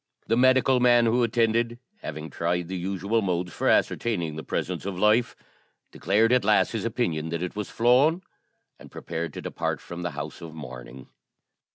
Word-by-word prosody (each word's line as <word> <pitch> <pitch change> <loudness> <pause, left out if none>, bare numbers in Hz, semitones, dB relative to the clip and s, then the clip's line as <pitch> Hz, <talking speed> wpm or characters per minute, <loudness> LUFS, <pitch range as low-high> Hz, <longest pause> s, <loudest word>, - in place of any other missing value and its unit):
The 115 - +1
medical 130 +1 +4
man 120 -1 +5
who 120 +2 +2
attended, 115 0 +1 0.2
having 80 - -7
tried 85 +1 -2
the 95 - -3
usual 100 +5 -1
modes 90 -3 -2
for - - 0
ascertaining 85 -10 +1
the 80 - -5
presence - - -3
of 95 -2 -4
life, 105 +4 +3 0.6
declared 110 +4 +2
at 125 - +3
last - - +3
his - - -3
opinion 80 -1 -1
that 85 +1 -3
it 90 - -5
was 105 -1 -4
flown, 135 +10 +3 0.6
and - - -13
prepared 85 0 -5
to - - -7
depart - - -3
from 85 0 -8
the 85 - -2
house - - -6
of 80 -2 -9
mourning. 65 -3 -10
100 Hz, 175 wpm, -26 LUFS, 85-120 Hz, 0.6 s, man